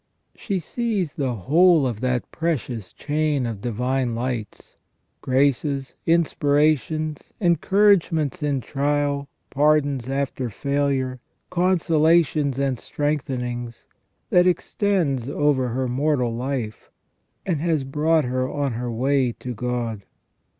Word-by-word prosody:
She 200 -3 -3
sees 195 -2 -2
the 130 -5 -2
whole 160 - +4
of 120 -5 -2
that 125 -1 -1
precious 130 - -3
chain 150 -3 -1
of 110 -4 -4
divine 125 +2 -1
lights, 120 -3 -5 0.5
graces, 135 0 +1
inspira 155 -2 +3
tions, 155 +4 -5
encouragements 180 - +2
in 145 -3 0
trial, 145 +1 -1 0.2
pardons 145 -3 +2
after 135 -2 -2
failure, 135 +2 -1 0.3
consolations 165 -5 +2
and 135 -3 0
strengthenings, 125 -5 -3 0.5
that 180 0 +5
extends 175 - 0
over 145 -3 +1
her 130 +2 -1
mortal 125 -2 0
life, 125 -3 -4 0.6
and 165 -6 -1
has 160 -4 +1
brought 150 +3 +1
her 130 +1 -1
on 140 -2 -1
her 120 +1 -3
way 130 +1 +1
to 125 +1 -6
God. 120 -2 -3
140 Hz, 110 wpm, -23 LUFS, 125-155 Hz, 0.6 s, that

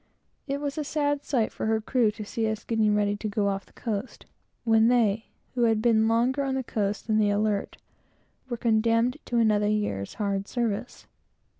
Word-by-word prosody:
It 280 0 -2
was 285 +1 -3
a - - -1
sad 290 -1 -1
sight 240 -6 0
for - - -4
her 220 0 +2
crew 230 0 +2
to 210 0 -6
see 220 +1 -1
us 220 0 -4
getting 220 -2 +2
ready 205 0 +1
to 215 - -4
go 205 -1 0
off 195 0 -3
the - - -24
coast, 220 0 -5 0.4
while 225 -2 +4
they, 225 -2 +3 0.3
who 245 -2 +2
had 225 -1 +3
been 220 -1 +3
longer 240 +5 +2
on 270 -1 -1
the 265 - -1
coast 210 -3 -2
than 220 -1 +2
the 210 -1 +3
Alert, 205 0 0 0.7
were 240 - -2
condemned 230 +3 +2
to 240 - -1
another 210 -2 +3
year's 205 - -2
hard 200 -2 -2
service. 235 -1 -3
220 Hz, 190 wpm, -27 LUFS, 210-240 Hz, 0.7 s, while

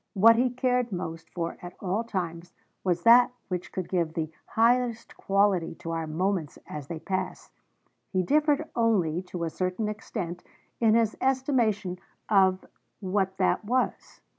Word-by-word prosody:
What 225 +4 +7
he 250 +2 +3
cared 250 -1 0
most 165 -3 -5
for 170 -1 -4
at 175 0 -9
all 200 +4 -1
times 175 -6 -4 0.3
was 175 -2 0
that 245 +2 +7 0.2
which 180 -1 -4
could 185 -2 -4
give 170 -4 -1
'the 155 -1 -2 0.2
highest 235 0 +1
quality 195 -4 +1
to 165 0 -6
our 165 -1 -2
moments 170 0 -1
as 150 -3 -7
they 165 - -5
pass'; 185 +4 -4 0.6
he 185 -1 +1
differed 300 - +2
only, 190 -8 +2
to 180 -2 -6
a 165 - -2
certain 185 +5 -2
extent, 180 -4 -5 0.4
in 225 -2 +4
his 225 -2 +2
estimation 235 -8 +1 0.3
of 190 -2 +4 0.3
what 190 -1 -1
that 185 - +1
was. 250 +4 -2
190 Hz, 150 wpm, -27 LUFS, 175-230 Hz, 0.6 s, What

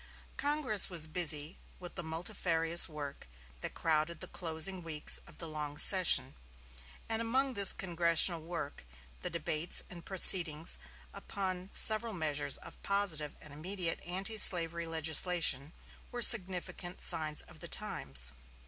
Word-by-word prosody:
Congress 285 -8 0
was 170 -4 -2
busy 155 -1 -1 0.2
with 180 -1 -12
the 175 - -8
multifarious 165 0 0
work 145 - -11 0.3
that - - -10
crowded 155 0 -3
the - - -10
closing 170 +2 -5
weeks 155 -3 -4
of - - -18
the 165 - -8
long 150 -2 -9
session; 185 +2 +3 0.7
and 225 0 -3
among 260 +4 -3
this 200 -4 +6
congressional 170 -1 +1
work 160 -3 -9 0.4
the - - -6
debates 155 +3 -2
and 170 -2 -13
proceedings 170 -4 +7 0.3
upon 185 -1 -8
several 220 +1 +3
measures 150 -5 -3
of - - -14
positive 185 -7 -3
and 150 -2 -15
immediate 170 +2 -5
antislavery 175 -3 +4
legislation 160 -2 0 0.4
were 240 -1 -3
significant 185 -4 +1
"signs 155 -3 0
of - - -16
the - - -10
times." 65 -3 -4
170 Hz, 130 wpm, -30 LUFS, 155-190 Hz, 0.7 s, proceedings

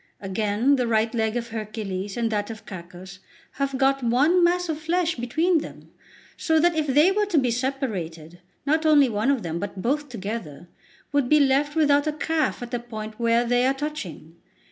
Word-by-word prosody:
Again, 210 +7 +1
the 250 -2 0
right 225 0 +1
leg 220 0 0
of 235 -1 -4
Hercules 210 -3 -5
and 230 -1 0
that 205 0 -1
of 220 -2 -9
Cacus 185 +1 -10 0.3
have 275 -1 -2
got 270 0 +2
one 285 +10 +3
mass 355 +1 +2
of 315 -2 -3
flesh 335 +1 0
between 315 +8 +1
them, - - -10 0.4
so 320 -1 +1
that 345 +1 +3
if 310 -1 0
they 295 +7 +4
were 415 +1 +1
to 360 -5 0
be 255 -4 +2
separated, 195 - -4 0.3
not 310 +2 +1
only 295 -4 +5
one 215 +4 0
of 270 -6 +1
them, 165 0 -3
but 195 0 -6
both 290 +4 -1
together, 200 - -6 0.4
would 285 -3 +1
be 300 - +5
left 285 +2 +2
without 290 -1 +3
a 305 - 0
calf 310 -3 -1
at 240 - -8
the 245 - -1
point 220 -2 -8
where 235 0 +2
they 245 +1 +2
are 270 - +1
touching. 270 - -6
245 Hz, 190 wpm, -24 LUFS, 215-295 Hz, 0.4 s, only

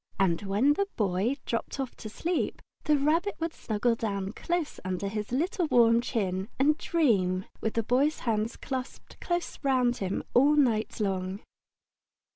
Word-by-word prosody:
And 175 -4 +2
when 205 +9 +3
the 400 +6 0
Boy 205 +5 +1
dropped 230 +4 -3
off 265 -2 -3
to 215 - -7
sleep, 335 +10 -2 0.2
the 300 -1 +4
Rabbit 325 +8 +1
would 330 0 -2
snuggle 220 +2 0
down 200 -4 -2
close 345 +6 -2
under 185 +1 -2
his 210 +1 -4
little 345 - 0
warm 235 -4 +5
chin 195 -5 -2
and 290 +3 +4
dream, 200 - +1 0.2
with 220 - -2
the 230 - +1
Boy's 270 +7 +1
hands 225 -1 -1
clasped 260 -1 -6
close 345 0 -2
round 255 -4 +2
him 190 -1 -2
all 285 +4 +5
night 235 -8 +2
long. 190 -1 -2
235 Hz, 155 wpm, -28 LUFS, 200-290 Hz, 0.2 s, warm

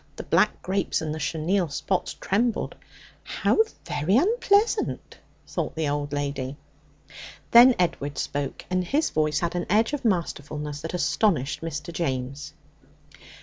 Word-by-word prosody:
The - - -6
black - - +2
grapes 190 0 0
and 155 -1 -3
the 155 - -5
chenille 165 +5 0
spots 180 +6 -2
trembled. 225 +3 0 0.5
'How - - 0 0.3
very 180 +9 +1
unpleasant!' 410 - +1 0.3
thought - - -4
the 160 -1 -1
old 145 0 -2
lady. 140 -1 -3 0.9
Then 240 +1 +9
Edward 145 -5 -1
spoke, 145 -1 -3
and 185 0 +1
his 290 - 0
voice 155 -1 +1
had 170 -1 -1
an 175 -1 -2
edge 220 +7 +3
of 290 - -2
masterfulness 150 - -2
that 165 +2 -4
astonished 170 - +1
Mr. 165 0 -5
James. 140 -2 -3
165 Hz, 135 wpm, -25 LUFS, 145-200 Hz, 0.9 s, Then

